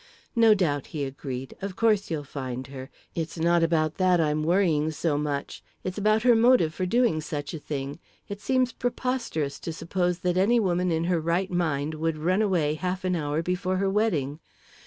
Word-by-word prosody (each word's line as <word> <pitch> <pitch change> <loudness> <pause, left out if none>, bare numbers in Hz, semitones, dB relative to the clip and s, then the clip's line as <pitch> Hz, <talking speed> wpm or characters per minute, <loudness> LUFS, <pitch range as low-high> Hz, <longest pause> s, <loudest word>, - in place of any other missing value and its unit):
"No 225 -2 +6
doubt," 150 -8 0
he 145 - -1
agreed. 135 -1 -6
"Of 195 -1 -4
course 215 -2 +2
you'll 155 -3 -2
find 130 -2 -5
her 130 0 -7 0.2
it's 165 0 -4
not 170 +1 +3
about 160 -1 +1
that 185 -2 +3
I'm 155 -1 +1
worrying 165 -3 +2
so 155 0 -1
much; 145 -1 -3 0.2
it's 185 +2 -4
about 215 +2 +2
her 245 -1 +6
motive 230 -8 +4
for 185 +3 -2
doing 230 -7 +2
such 145 -2 -5
a 160 - -5
thing. 140 0 -5 0.3
It 200 0 -7
seems 255 0 +1
preposterous 235 - -2
to 165 - -5
suppose 175 +2 -1
that 180 0 +2
any 225 +6 +4
woman 180 -3 +1
in 165 0 0
her 170 -1 +1
right 170 +4 0
mind 155 -4 0
would 160 0 -1
run 180 +6 +1
away 175 -8 +1
half 185 +4 -3
an 180 -1 +1
hour 150 0 -1
before 180 +1 -1
her 195 0 +1
wedding. 160 -9 0
170 Hz, 190 wpm, -26 LUFS, 150-195 Hz, 0.3 s, No